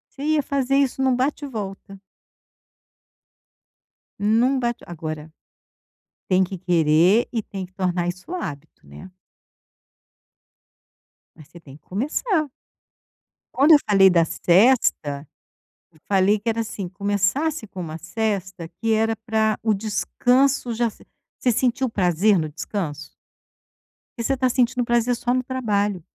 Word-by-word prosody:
Você 275 - -10
ia 305 0 +1
fazer 275 -1 0
isso 270 -1 +1
em 265 - +2
um 255 - +3
bate 275 +4 -1
e - - -4
volta. 195 -4 -7 2.2
Num 230 +6 +2
bate 240 -1 -2
agora, 155 -2 -6 1.0
tem 185 0 +4
que 190 +1 -5
querer 175 +4 +3
e 230 -3 -1
tem 195 -2 -6
que 185 - -22
tornar 180 -2 -1
isso 185 - -6
hábito, 155 - -7
né? 185 - -12 2.2
Mas 155 -3 -15
você 170 - -14
tem 140 -4 -14
que - - -34
começar. 305 - -1 1.1
Quando 290 +5 +6
eu - - +9
falei 195 -2 +6
da 170 -2 +3
sesta, 170 - +2 0.6
eu 155 - -25
falei 200 +1 +3
que 215 - -11
era 230 0 +1
assim: 210 -4 -5
Começasse 205 - -1
com 190 -2 -8
uma 160 -2 -6
sesta, 190 -2 -3
que 225 0 +1
era 225 +1 +2
para 220 -1 +1
o 220 -1 +2
descanso 245 +5 +1
já 235 +1 0
s 225 - -6 0.3
você 250 - +1
sentiu 250 +2 0
prazer 190 0 +2
no 155 - -2
descanso? 155 -1 -5 1.1
Porque 235 - -4
você 275 - +1
está 260 0 +1
sentindo 245 0 +1
prazer 240 +1 +1
só 240 +1 -1
no 255 - +1
trabalho. 210 - -1
210 Hz, 140 wpm, -22 LUFS, 180-250 Hz, 2.2 s, eu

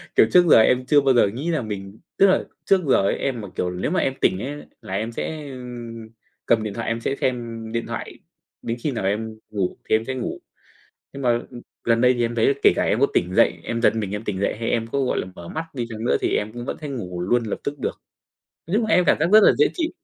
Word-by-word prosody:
kiểu, - - +6
trước 180 -1 +6
giờ - - +8
em 125 +3 +3
chưa 145 +2 +5
bao 135 -1 +3
giờ 120 - +5
nghĩ 130 +11 -4
là 160 - 0
mình 100 -2 -7 0.2
tức 195 - +6
là 190 - +3 0.2
trước 195 -2 +4
giờ - - +6
ấy 100 - +1
em 130 -4 -2
mà, 100 - -7
kiểu, 90 - -1
nếu 90 +10 -3
mà 185 - +2
em 135 - 0
tỉnh 95 - +2
ấy 145 +6 -5 0.2
là 95 - -8
em 110 +4 -2
sẽ, 150 +4 -5
ừ, 130 - -8 0.9
cầm 115 -2 +3
điện 105 -2 -4
thoại 115 +2 -5
em 115 0 -1
sẽ 135 - -1
xem, 130 - +2 0.3
ưm, 110 - -8
điện 115 0 -2
thoại - - -6 0.4
đến 115 +1 -3
khi 150 - 0
nào 115 -6 -3
em 110 +3 -2
ngủ 100 -4 -2
thì - - +5
em 110 +1 0
sẽ 130 - -3
ngủ. 125 - -4 0.7
Nhưng 140 - -7
mà, 125 - +3 0.2
ừm, 120 - -9 0.2
gần 115 -1 +2
đây 125 +1 +5
thì 120 - -1
em 115 0 -2
thấy 115 +4 +3
kể - - +7
cả - - +1
em - - +1
có - - +5
tỉnh - - +1
dậy, - - +3
em 115 0 -3
giật - - +4
mình 105 -4 -2
em 105 +1 -4
tỉnh 100 -3 -3
dậy 100 - 0
hay 115 - -2
em 115 -1 0
có, 140 +5 -2
gọi 130 - 0
là, - - -5
mở 85 - -10
mắt 160 +1 -4
đi 120 -3 -3
chăng 110 -1 -6
nữa 125 - +3
thì - - +1
em 105 +1 -2
cũng 120 +1 -7
vẫn - - -4
thấy 150 - -6
ngủ 90 -9 -5
luôn 120 +7 +1
lập 105 - -3
tức 145 +1 -3
được. - - -4 0.7
Nói 175 +5 0
chung 225 0 +1
là 215 - +3
em 180 - +4
cảm - - +4
giác 160 - +3
rất 215 - +9
là - - +7
dễ 435 - +5
chịu. 330 -2 -1
120 Hz, 285 wpm, -23 LUFS, 110-140 Hz, 0.9 s, rất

